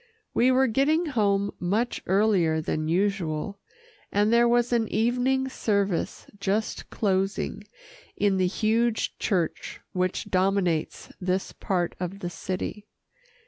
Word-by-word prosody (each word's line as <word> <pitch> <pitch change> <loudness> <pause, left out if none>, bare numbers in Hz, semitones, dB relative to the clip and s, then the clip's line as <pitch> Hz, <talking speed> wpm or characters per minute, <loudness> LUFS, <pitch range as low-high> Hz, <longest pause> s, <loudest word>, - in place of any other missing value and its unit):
We 245 - +4
were 260 +1 +4
getting 280 +8 +2
home 200 -8 +1
much 215 +7 0
earlier 190 -5 +3
than 155 0 -2
usual, 185 0 -1 0.5
and 210 +2 +2
there 235 0 +5
was 240 0 +2
an 230 -2 +2
evening 250 +4 +1
service 200 -8 -1
just 205 +3 -1
closing 195 -1 -1 0.5
in 200 -2 +2
the 185 -1 +2
huge 225 +4 0
church 175 -5 -1
which 185 +2 -1
dominates 185 -4 0
this 185 +1 -1
part 180 -3 -1
of 180 +2 -4
the 175 -3 -5
city. 190 +4 -5
200 Hz, 120 wpm, -26 LUFS, 185-230 Hz, 0.5 s, there